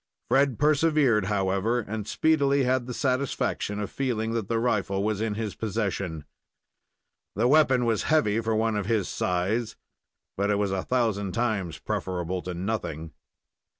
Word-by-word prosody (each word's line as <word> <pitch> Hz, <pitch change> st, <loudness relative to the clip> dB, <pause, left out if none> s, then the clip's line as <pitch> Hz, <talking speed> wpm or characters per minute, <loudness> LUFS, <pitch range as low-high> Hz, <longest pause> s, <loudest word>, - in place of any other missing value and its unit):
Fred 135 Hz, -3 st, +3 dB
persevered, 145 Hz, -, +3 dB
however, 100 Hz, +4 st, 0 dB
and 105 Hz, -1 st, -5 dB
speedily 140 Hz, +1 st, +2 dB
had 125 Hz, -1 st, +1 dB
the 125 Hz, -, -4 dB
satisfaction 130 Hz, -6 st, -1 dB
of 105 Hz, -, -4 dB
feeling 115 Hz, -5 st, -1 dB
that 115 Hz, -4 st, -2 dB
the 115 Hz, -, 0 dB
rifle 100 Hz, -4 st, 0 dB
was 105 Hz, -1 st, -1 dB
in 110 Hz, -2 st, -1 dB
his 110 Hz, -2 st, -3 dB
possession. 100 Hz, -7 st, -3 dB, 1.1 s
The 115 Hz, +5 st, +2 dB
weapon 130 Hz, -3 st, +4 dB
was 115 Hz, -2 st, +1 dB
heavy 115 Hz, -9 st, +3 dB
for 110 Hz, 0 st, 0 dB
one 110 Hz, 0 st, +1 dB
of 100 Hz, -2 st, -2 dB
his 110 Hz, -4 st, +1 dB
size, 100 Hz, +6 st, -1 dB, 0.6 s
but 100 Hz, +1 st, 0 dB
it 105 Hz, -, +2 dB
was 100 Hz, -1 st, 0 dB
a 95 Hz, -1 st, -1 dB
thousand 105 Hz, -6 st, 0 dB
times 100 Hz, -9 st, -1 dB
preferable 90 Hz, +2 st, -3 dB
to 90 Hz, 0 st, -5 dB
nothing. 85 Hz, -5 st, -4 dB
110 Hz, 150 wpm, -26 LUFS, 100-125 Hz, 1.1 s, weapon